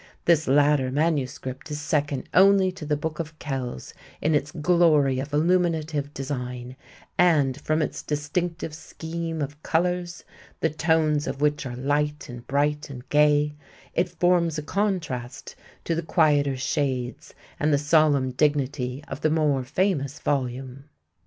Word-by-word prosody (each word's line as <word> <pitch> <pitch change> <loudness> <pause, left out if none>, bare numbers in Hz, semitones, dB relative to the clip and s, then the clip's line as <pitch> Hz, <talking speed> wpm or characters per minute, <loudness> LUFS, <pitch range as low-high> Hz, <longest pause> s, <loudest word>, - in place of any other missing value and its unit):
This 160 -2 +3
latter 140 -1 +3
manuscript 140 -2 -2
is 150 0 -4
second 145 -2 -1
only 190 0 +5
to 180 -5 -9
the 150 -1 +1
Book 155 +1 -4
of 155 -1 -5
Kells 130 - -5 0.3
in 155 - +1
its 145 0 0
glory 155 -5 +3
of 140 +2 -5
illuminative 160 -2 +1
design, 125 -3 -5 0.4
and, 150 -7 +3
from 155 0 +1
its - - -4
distinctive 165 +3 -3
scheme 165 0 -5
of 145 +2 -7
colors, 175 +1 -1 0.4
the 160 - +1
tones 155 -2 +1
of - - -4
which 145 -1 +1
are 120 - -6
light 145 +3 -1
and 120 -1 -9
bright 145 +2 0
and 125 -2 -9
gay, 150 0 +3 0.4
it 175 +1 +1
forms 175 -3 +3
a 150 - -3
contrast 155 - -3 0.3
to 170 - -1
the 165 - -1
quieter 150 -5 +2
shades 130 -2 -2 0.2
and 150 +1 +2
the 145 - +4
solemn 145 -3 +3
dignity 140 -1 0
of - - -7
the 155 - +2
more 150 -4 +1
famous 145 -1 -1
volume. 130 0 -3
150 Hz, 145 wpm, -25 LUFS, 135-160 Hz, 0.4 s, only